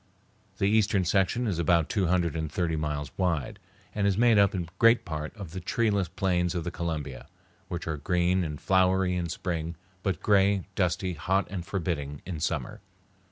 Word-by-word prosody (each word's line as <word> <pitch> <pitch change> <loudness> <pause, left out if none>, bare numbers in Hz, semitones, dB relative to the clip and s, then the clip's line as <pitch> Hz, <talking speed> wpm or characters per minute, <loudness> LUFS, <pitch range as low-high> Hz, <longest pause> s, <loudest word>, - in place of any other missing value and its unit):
The - - +1
eastern 105 -2 +3
section 95 +7 +1
is 95 -7 -1
about 85 -1 +3
two 95 -4 0
hundred 85 -3 +1
and 80 -2 -3
thirty 85 -1 0
miles 75 -2 -3
wide, 85 -8 -1 0.3
and 100 -1 +1
is 100 -1 +1
made 115 -2 +5
up 100 0 +4
in 85 -3 -2
great 115 0 +5
part 75 -2 -4
of 100 -6 -8
the 95 - -5
treeless 100 0 +1
plains 90 0 0
of 85 - -1
the 85 - -3
Columbia, 80 -8 -4 0.4
which 85 -1 -5
are 80 -1 -2
green 90 +4 +1
and 75 -3 -4
flowery 95 -1 +2
in 85 -1 -2
spring, 85 -1 -3 0.3
but 95 -5 -1
gray, 100 -2 +3
dusty, 90 0 0
hot, 95 +6 0
and 90 -4 -5
forbidding 75 -6 -3
in 85 -3 -5
summer. - - -3
90 Hz, 180 wpm, -28 LUFS, 80-95 Hz, 0.4 s, made